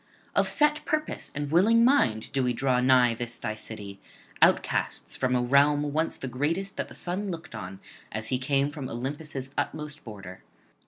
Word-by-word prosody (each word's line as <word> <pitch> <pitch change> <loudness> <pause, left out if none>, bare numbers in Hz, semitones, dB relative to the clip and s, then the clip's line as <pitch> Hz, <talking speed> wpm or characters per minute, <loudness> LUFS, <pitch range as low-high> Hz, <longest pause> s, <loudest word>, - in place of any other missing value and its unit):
Of - - +3
set 300 0 +3
purpose 310 0 -2
and 145 0 -3
willing 225 +8 +5
mind 120 - +2
do 135 -2 +1
we 125 -1 +1
draw 130 0 +1
nigh 125 -2 +5
this 120 0 -3
thy 110 - -3
city, 105 -2 -7 0.4
outcasts - - +2
from 130 -1 +1
a 125 - +2
realm 145 +3 +3
once 160 +2 0
the 135 - -5
greatest 165 +10 -2
that - - -2
the - - -11
sun 190 +3 -3
looked 170 -1 -7
on 95 +1 -7 0.3
as 110 +1 -4
he 130 - 0
came 140 +2 +1
from 145 -4 -6
Olympus' 135 +2 -5
utmost 150 -1 -3
border. 95 -5 -9
135 Hz, 175 wpm, -27 LUFS, 120-160 Hz, 0.4 s, willing